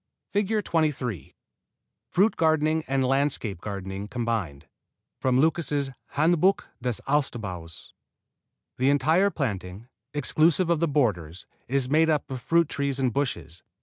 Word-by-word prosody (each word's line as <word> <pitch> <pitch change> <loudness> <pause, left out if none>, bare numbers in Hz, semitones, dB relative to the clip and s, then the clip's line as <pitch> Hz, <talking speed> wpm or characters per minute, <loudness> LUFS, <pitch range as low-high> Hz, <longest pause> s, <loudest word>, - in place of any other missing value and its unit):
[Illustration: 205 +2 +1
FIG. 210 - -2
23 130 - -1 0.7
FRUIT 205 +5 +3
GARDENING 160 0 +2
AND 135 0 +1
LANDSCAPE 130 - +1
GARDENING 100 0 -5
COMBINED 115 - -3 0.5
From 130 -1 +2
Lucas' 145 -3 +1 0.2
Handbuch 170 +5 +3 0.2
des 125 -1 -1
Obstbaues 100 - -3 0.9
The 130 +2 +3
entire 160 +7 +3
planting, 105 - -4 0.3
exclusive 160 +5 +2
of 170 - +2
the 170 - +2
borders, 100 - -1 0.2
is 135 0 0
made 160 +4 +3
up 150 -3 0
of 130 -2 -4
fruit 170 +3 +3
trees 140 -2 -2
and 130 -4 0
bushes. 125 - -3
135 Hz, 125 wpm, -26 LUFS, 110-160 Hz, 0.9 s, FRUIT